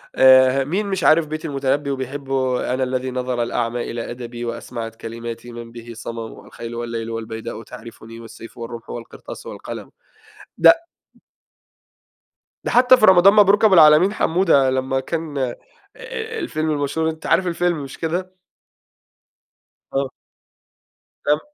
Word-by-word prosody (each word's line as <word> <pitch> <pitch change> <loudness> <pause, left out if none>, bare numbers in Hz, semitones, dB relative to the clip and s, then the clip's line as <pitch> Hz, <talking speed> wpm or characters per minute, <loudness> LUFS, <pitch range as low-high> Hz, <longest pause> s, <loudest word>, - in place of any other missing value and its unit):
آآ، 130 0 +6
مين 185 +10 -2
مش 190 -2 -2
عارف 155 0 +5
بيت 155 +2 -5
المتنبّي 140 0 -1
وبيحبه؟ 130 -1 -2
آآ، - - 0
"أنا 130 0 0
الّذي 130 0 -2
نَظَر 125 -1 -2
الأعمى 120 0 -2
إلى 115 0 -5
أَدَبي، 120 0 -7
وأَسمعت 115 -1 -6
كَلِماتي 115 +1 -7
مَن 120 0 -9
به 120 0 -10
صَمَم، 115 0 -8
الخيلُ 115 0 -8
والليلُ 115 -1 -4
والبيداءُ 110 0 -6
تعرفني، 115 0 -11
والسيفُ 115 0 -12
والرمحُ 115 0 -8
والقرطاسُ 120 -1 -9
والقلمُ." - - -8 0.7
ده - - +9 1.9
ده - - -2
حتّى 250 +1 +6
في 215 - +5
رمضان 190 +1 +7
مبروك 205 +1 +5
أبو 210 - +5
العلمين 160 +4 +7
حمودة، 160 -9 +3
لمّا 130 0 0
كان 160 +1 -4
آآ، 130 -3 -1 0.8
الفيلم 155 - -2
المشهور، 150 +2 -1
أنتَ 160 0 -8
عارف 180 +2 +2
الفيلم، 175 -3 0
مش 135 - -9
كده؟ 185 +3 -3 1.6
آه. 135 -1 0 1.2
لمّا 150 +1 +3
130 Hz, 135 wpm, -21 LUFS, 120-160 Hz, 1.9 s, ده